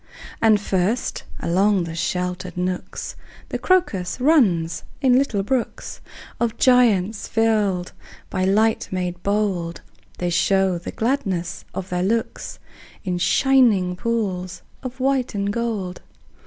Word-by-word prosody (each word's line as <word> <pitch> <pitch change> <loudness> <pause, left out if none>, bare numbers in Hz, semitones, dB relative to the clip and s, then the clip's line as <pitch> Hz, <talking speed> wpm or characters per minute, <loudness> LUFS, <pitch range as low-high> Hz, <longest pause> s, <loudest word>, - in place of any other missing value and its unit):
And 220 -2 +5
first, 200 +4 -1 0.2
along 190 +2 +2
the 165 -1 -5
sheltered 180 +2 -3
nooks, 180 0 -3 0.3
The - - -3
crocus 260 - +1
runs 215 - +3 0.2
in 260 -3 +4
little 245 -7 +1
brooks 250 +3 -3 0.4
Of 235 -2 0
joyance, 225 -5 +3
till 210 -5 +2 0.5
by 185 - 0
light 215 +4 +2
made 180 -1 -3
bold 195 -5 -1 0.4
They 175 -1 -1
show 190 +1 +2
the 170 - -7
gladness 215 -9 -2
of 190 0 -4
their 180 0 -1
looks 225 +5 -2 0.5
In 180 -2 -2
shining 220 -6 +3
pools 185 -5 -2 0.2
of 255 0 -7
white 260 -3 0
and 200 0 -1
gold. 215 -6 -3
200 Hz, 120 wpm, -22 LUFS, 180-230 Hz, 0.5 s, And